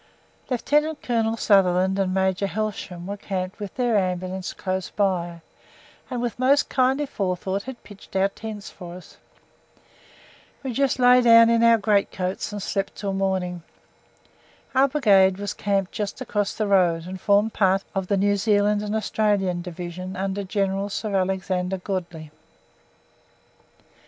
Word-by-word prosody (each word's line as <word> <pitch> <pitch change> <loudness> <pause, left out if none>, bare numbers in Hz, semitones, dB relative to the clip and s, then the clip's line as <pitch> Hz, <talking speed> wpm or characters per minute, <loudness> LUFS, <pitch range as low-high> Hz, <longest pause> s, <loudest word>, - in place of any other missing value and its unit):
Lieutenant 295 +5 +1
Colonel 225 -2 0
Sutherland 190 -2 +3
and 190 -1 +1
Major 190 +1 +1
Helsham 195 -4 -4
were 200 +2 -5
camped 190 0 -4
with 205 -2 -7
their 245 -4 +1
Ambulance 185 0 -3
close 185 -1 -3
by, 175 -4 -1 0.7
and 245 -2 -3
with 240 0 -3
most 275 +3 +3
kindly 265 +3 +2
forethought 190 -4 -2
had 260 +2 -9
pitched 205 -1 -15
our 190 +1 +3
tents 215 0 -8
for 175 -2 -10
us. 180 - -14 1.5
We 260 -2 -3
just 275 +2 +1
lay 250 0 +6
down 230 -1 +7
in 230 0 +3
our 230 0 +6
greatcoats 200 -3 -1
and 205 -2 -5
slept 195 -1 -2
until 200 -2 -3
morning. 190 -2 -1 1.1
Our 270 +1 +4
Brigade 200 -10 +4
was 205 0 -4
camped 195 -2 -1
just 210 0 -4
across 210 -5 -2
the 215 - -1
road, 175 -5 +2
and 185 +1 -7
formed 205 +2 +3
part 195 -1 +2
of 190 -1 -2
the 200 - +1
New 205 +1 +2
Zealand 205 0 +2
and 210 +1 -3
Australian 205 -5 0
Division 180 +1 -7
under 195 +1 -2
General 195 0 -1
Sir 205 0 -3
Alexander 185 0 -1
Godley. 175 -5 -5
195 Hz, 145 wpm, -24 LUFS, 185-220 Hz, 1.5 s, down